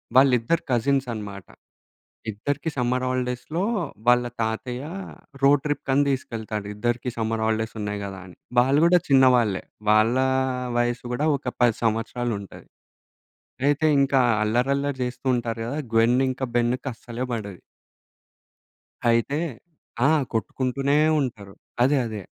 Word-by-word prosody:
వాళ్ళిద్దరు 130 +3 +4
కజిన్స్ 135 +2 +1
అన్నమాట. 100 -4 -7 0.9
ఇద్దరికీ 140 +9 -3
సమ్మర్ 125 0 0
హాలిడేస్‌లో 125 +6 -2 0.4
వాళ్ళ 125 0 +5 0.2
తాతయ్య 120 +4 -3 0.6
రోడ్ 140 0 +5
ట్రిప్ 145 -1 -2
కని 140 +2 +4
తీసుకెళ్తాడు. 110 -5 -4
ఇద్దరికీ 120 +3 -1
సమ్మర్ 110 0 -1
హాలిడేస్ 110 0 -1
ఉన్నాయి 105 0 -3
కదా! 95 -1 -7
అని 90 - -14 0.2
వాళ్ళు 135 +4 +4
కూడా 175 +1 +6
చిన్నవాళ్ళే. 125 -7 +4 0.3
వాళ్ళ 110 +3 +4 0.6
వయసు 120 0 0
కూడా 150 +5 0
ఒక - - -14 0.2
10 120 -3 +4
సంవత్సరాలు 115 +1 -1
ఉంటది. 100 - -12 1.0
అయితే 145 +2 +2 0.2
ఇంకా 135 -1 +3 0.2
అల్లరి 120 +5 +1
అల్లరి 140 -1 -2
చేస్తూ 125 +1 -6
ఉంటారు 115 -1 -3
కదా! 145 +5 -3 0.2
గ్వెన్ 115 +3 +4
ఇంకా 130 +1 -2
బెన్ 120 +1 +2
కసలే 120 0 -5
పడది. 100 -5 -5 1.5
అయితే 115 +6 +1 0.7
ఆ! - - +4 0.2
కొట్టుకుంటూనే 135 +5 0 0.2
ఉంటారు. 105 -7 -5 0.3
అదే. 135 +4 +4
అదే. 110 -3 -5
120 Hz, 125 wpm, -24 LUFS, 110-135 Hz, 1.5 s, కూడా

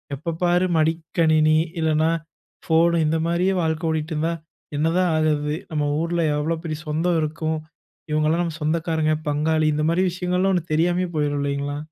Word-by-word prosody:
எப்போ 160 +5 -4
பாரு 175 +1 +3
மடிக்கணினி, 160 -1 +2 0.2
இல்லனா 160 0 +2 0.6
ஃபோன் 170 +1 +3
இந்த 160 +1 +1
மாரியே 180 +3 +1
வாழ்க்கை 160 0 -1
ஓடிட்டுருந்தா, 160 +1 -1 0.4
என்னதான் 170 +4 +2
ஆகுறது. 150 -1 +1 0.2
நம்ம 150 -1 0
ஊர்ல 170 0 -1 0.2
எவ்வளோ 160 +3 -1
பெரிய 155 -1 -3
சொந்தம் 165 +2 +1
இருக்கும். 160 +1 -2 0.5
இவங்கலாம் 155 +3 +2
நம்ம 165 -2 -4
சொந்தக்காரங்க, 160 0 0 0.2
பங்காளி 155 +1 +1
இந்த 150 +1 0
மாரி 170 +2 +2
விஷயங்கள்லாம் 180 +2 0
ஒண்ணு 170 -2 -3
தெரியாமயே 175 +2 +1
போயிரும் 145 -1 0
இல்லைங்களா? 140 0 -2
160 Hz, 140 wpm, -23 LUFS, 155-170 Hz, 0.6 s, பாரு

